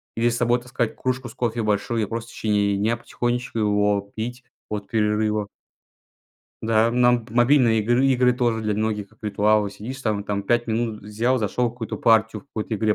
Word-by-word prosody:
Или 115 Hz, +1 st, +2 dB
с 115 Hz, -, -2 dB
собой 120 Hz, +1 st, +2 dB
таскать 120 Hz, -2 st, -2 dB
кружку 130 Hz, -1 st, -2 dB
с 115 Hz, -, -11 dB
кофе 120 Hz, -2 st, -1 dB
большую 105 Hz, +2 st, 0 dB
и -, -, 0 dB
просто 115 Hz, +2 st, -5 dB
в -, -, -13 dB
течение 100 Hz, -2 st, +1 dB
дня 110 Hz, +4 st, +1 dB
потихонечку 120 Hz, 0 st, -3 dB
его 105 Hz, -1 st, +1 dB
пить 120 Hz, +3 st, -5 dB, 0.2 s
от 105 Hz, -1 st, -4 dB
перерыва. 105 Hz, -1 st, 0 dB, 1.2 s
Да, 110 Hz, +1 st, +3 dB
нам 120 Hz, -1 st, +3 dB
мобильные 120 Hz, -2 st, +4 dB
игры 120 Hz, +5 st, +2 dB
игры 125 Hz, -1 st, +4 dB
тоже 120 Hz, -2 st, 0 dB
для 105 Hz, -1 st, 0 dB
многих, 105 Hz, -1 st, -2 dB
как 110 Hz, -, -26 dB
ритуалы. 105 Hz, 0 st, +2 dB
Сидишь 115 Hz, +7 st, -8 dB
там 105 Hz, -4 st, -1 dB
там 100 Hz, -1 st, -2 dB
5 120 Hz, +4 st, +1 dB
минут, 110 Hz, -1 st, -2 dB
взял, 115 Hz, +5 st, 0 dB
зашел 115 Hz, +3 st, 0 dB
в -, -, -8 dB
какую-то 120 Hz, -2 st, -5 dB
партию 110 Hz, -1 st, +3 dB
в -, -, -30 dB
какой-то 110 Hz, -3 st, -4 dB
игре, 110 Hz, 0 st, +1 dB
115 Hz, 190 wpm, -23 LUFS, 105-120 Hz, 1.2 s, мобильные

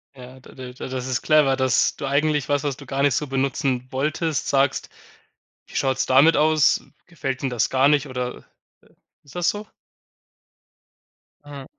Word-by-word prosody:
Ja, 130 Hz, 0 st, -12 dB
da 130 Hz, -, -16 dB
da 130 Hz, -1 st, -9 dB
da 130 Hz, -, -8 dB
das 130 Hz, -1 st, -4 dB
ist 130 Hz, -2 st, -2 dB
clever, 150 Hz, -4 st, +4 dB
dass 130 Hz, -2 st, +1 dB
du 145 Hz, -, -6 dB
eigentlich 145 Hz, +1 st, 0 dB
was, 145 Hz, 0 st, 0 dB
was 140 Hz, -3 st, -2 dB
du 140 Hz, -, -12 dB
gar 135 Hz, +1 st, -3 dB
nicht 140 Hz, -3 st, +3 dB
so 150 Hz, -, -1 dB
benutzen 135 Hz, -2 st, -1 dB
wolltest, 150 Hz, +3 st, -2 dB
sagst: 135 Hz, 0 st, +1 dB, 0.8 s
„Wie -, -, -10 dB
schaut's 130 Hz, 0 st, 0 dB
damit 140 Hz, +5 st, +5 dB
aus? 155 Hz, -1 st, +3 dB, 0.2 s
Gefällt 135 Hz, -6 st, -5 dB
Ihnen 135 Hz, -, -1 dB
das 120 Hz, -3 st, 0 dB
gar 135 Hz, +1 st, +3 dB
nicht?“ 145 Hz, -1 st, +2 dB
oder 125 Hz, -1 st, -4 dB
äh, -, -, -19 dB, 0.8 s
ist 140 Hz, -, -17 dB
das 175 Hz, 0 st, 0 dB
so? 210 Hz, +2 st, -2 dB, 1.8 s
Ja. 140 Hz, -2 st, -9 dB
135 Hz, 175 wpm, -22 LUFS, 130-150 Hz, 1.8 s, damit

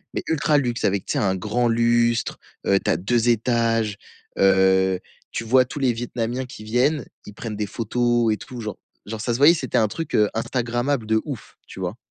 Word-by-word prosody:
mais -, -, -2 dB
ultra 155 Hz, -1 st, +2 dB
luxe 120 Hz, -3 st, -1 dB
avec, 100 Hz, -1 st, +1 dB
tu -, -, -2 dB
sais, -, -, 0 dB
un 95 Hz, -2 st, +1 dB
grand 110 Hz, +6 st, 0 dB
lustre, 115 Hz, 0 st, +2 dB, 0.3 s
heu, 100 Hz, 0 st, +4 dB
tu -, -, -1 dB
as -, -, +3 dB
2 115 Hz, +6 st, +1 dB
étages, 115 Hz, -2 st, +1 dB, 0.4 s
heu, 95 Hz, -1 st, +4 dB, 0.3 s
tu 115 Hz, -, -3 dB
vois, 130 Hz, +3 st, +4 dB
tous 135 Hz, -, -9 dB
les 130 Hz, -3 st, +2 dB
vietnamiens 120 Hz, +2 st, -3 dB
qui 110 Hz, -3 st, -11 dB
viennent, 125 Hz, +5 st, +1 dB, 0.2 s
ils 105 Hz, -, -9 dB
prennent 110 Hz, -3 st, -5 dB
des 105 Hz, -1 st, -2 dB
photos 120 Hz, +1 st, +1 dB
et -, -, -3 dB
tout, 125 Hz, -2 st, -9 dB
genre 105 Hz, -3 st, -5 dB, 0.3 s
genre 110 Hz, +1 st, -5 dB
ça 120 Hz, -, -1 dB
se -, -, -1 dB
voyait, 150 Hz, +5 st, +7 dB
c'était 135 Hz, -7 st, -2 dB
un 110 Hz, -, +4 dB
truc, 165 Hz, +10 st, -4 dB
heu, 105 Hz, -1 st, +4 dB
instagrammable 120 Hz, +2 st, -1 dB
de 110 Hz, 0 st, +2 dB
ouf, 140 Hz, -7 st, -8 dB
tu -, -, -10 dB
vois? 90 Hz, +4 st, -4 dB
115 Hz, 210 wpm, -23 LUFS, 105-125 Hz, 0.4 s, voyait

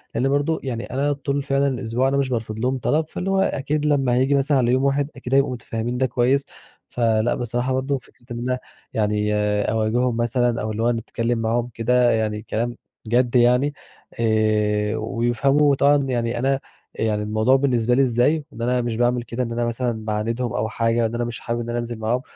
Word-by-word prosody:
لأن 125 Hz, +4 st, +1 dB
برضه 145 Hz, +3 st, +1 dB
يعني 120 Hz, -3 st, -4 dB
أنا 140 Hz, +3 st, +1 dB
طول 140 Hz, 0 st, -2 dB
فعلًا 135 Hz, +1 st, +1 dB
الأسبوع 125 Hz, -1 st, 0 dB
أنا 140 Hz, -, +1 dB
مش 135 Hz, -1 st, 0 dB
بارفض 110 Hz, -3 st, -3 dB
لهم 130 Hz, +3 st, 0 dB
طلب، 155 Hz, +4 st, +1 dB
فاللي 185 Hz, -, -4 dB
هو 195 Hz, 0 st, +2 dB
أكيد 150 Hz, -4 st, 0 dB
لما 135 Hz, -4 st, +2 dB
هييجي 135 Hz, +3 st, +3 dB
مثلًا 140 Hz, +1 st, +2 dB
على 120 Hz, -1 st, +2 dB
يوم 130 Hz, +1 st, +2 dB
واحد 140 Hz, +1 st, +1 dB
أكيد 125 Hz, -, -6 dB
هيبقوا 140 Hz, -1 st, +3 dB
متفهمين 115 Hz, 0 st, -4 dB
ده 130 Hz, -, +2 dB
كويس، 130 Hz, +3 st, +1 dB, 0.5 s
فلأ 115 Hz, -1 st, +2 dB
بصراحة 120 Hz, +2 st, -2 dB
برضه 135 Hz, +1 st, 0 dB
فكرة 120 Hz, -, -19 dB
إن 120 Hz, -, -4 dB
أنا 125 Hz, +1 st, -1 dB, 0.3 s
يعني 105 Hz, -1 st, 0 dB, 0.4 s
أواجههم 115 Hz, +2 st, +1 dB
مثلًا 120 Hz, 0 st, +1 dB
أو 110 Hz, 0 st, -2 dB
اللي 110 Hz, +2 st, -2 dB
هو 120 Hz, -, +3 dB
إنّي 115 Hz, -1 st, 0 dB
أتكلم 115 Hz, +1 st, -2 dB
معاهم 115 Hz, +2 st, 0 dB
كده 125 Hz, +1 st, +3 dB
يعني 110 Hz, -1 st, -1 dB
كلام 120 Hz, +2 st, -3 dB, 0.3 s
جد 120 Hz, +2 st, +2 dB
يعني 125 Hz, +4 st, +4 dB, 0.5 s
آآ، 110 Hz, -1 st, +1 dB
ويفهموا 135 Hz, +5 st, +2 dB
طبعًا 140 Hz, +2 st, +4 dB
يعني 120 Hz, -3 st, -1 dB
أنا 135 Hz, +2 st, +1 dB, 0.3 s
يعني 105 Hz, -1 st, -1 dB
الموضوع 110 Hz, +5 st, +2 dB
بالنسبة 125 Hz, -4 st, +2 dB
لي 135 Hz, -, +4 dB
إزاي، 135 Hz, +5 st, +2 dB
إن 115 Hz, -, -8 dB
أنا 125 Hz, +1 st, +1 dB
مش 120 Hz, -2 st, -2 dB
باعمل 120 Hz, 0 st, +1 dB
كده 120 Hz, +2 st, -3 dB
إن 115 Hz, -, -4 dB
أنا 120 Hz, 0 st, -1 dB
مثلًا 120 Hz, -2 st, -2 dB
باعاندهم 115 Hz, +3 st, -2 dB
أو 110 Hz, +1 st, -1 dB
حاجة 115 Hz, 0 st, +1 dB
إن 115 Hz, +1 st, -2 dB
أنا 120 Hz, -, -1 dB
مش 120 Hz, 0 st, -5 dB
حابب 120 Hz, 0 st, -3 dB
إن 120 Hz, 0 st, -5 dB
أنا 120 Hz, -, -1 dB
أنزل 120 Hz, -1 st, -5 dB
معاهم، 120 Hz, +3 st, 0 dB
120 Hz, 200 wpm, -22 LUFS, 115-135 Hz, 0.5 s, يعني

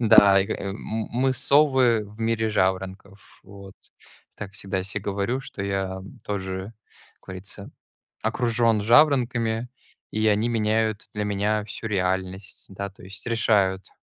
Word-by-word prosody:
Да, 100 Hz, -4 st, +7 dB
и 95 Hz, -, 0 dB
ка 110 Hz, -, -2 dB
м 100 Hz, 0 st, -4 dB, 0.3 s
мы 130 Hz, +2 st, +1 dB
совы 130 Hz, -4 st, +4 dB
в 105 Hz, +2 st, -14 dB
мире 115 Hz, -1 st, 0 dB
жаворонков, 95 Hz, 0 st, -2 dB
вот. 100 Hz, -1 st, -12 dB, 0.6 s
И -, -, -40 dB
так 100 Hz, -2 st, -7 dB
всегда 100 Hz, -1 st, -3 dB
я 95 Hz, -, -3 dB
се 100 Hz, +1 st, -4 dB
говорю, 100 Hz, +6 st, -2 dB
что 105 Hz, -6 st, -7 dB
я, 95 Hz, -1 st, -1 dB
м, 100 Hz, +6 st, -12 dB
тоже, 95 Hz, 0 st, -4 dB, 0.4 s
как -, -, -45 dB
говорится, 95 Hz, +1 st, -8 dB, 0.5 s
окружен 115 Hz, -3 st, +2 dB
жаворонками, 120 Hz, -2 st, +3 dB, 0.4 s
и 110 Hz, +1 st, +1 dB
они 105 Hz, +2 st, +2 dB
меняют 110 Hz, -1 st, 0 dB
для 105 Hz, 0 st, -2 dB
меня 105 Hz, +1 st, 0 dB
всю 110 Hz, +2 st, -7 dB
реальность, 95 Hz, 0 st, -2 dB
да, 100 Hz, +1 st, -4 dB
то 100 Hz, -, -18 dB
есть, 95 Hz, +5 st, -8 dB
решают, 100 Hz, -5 st, +2 dB
105 Hz, 150 wpm, -25 LUFS, 95-115 Hz, 0.6 s, Да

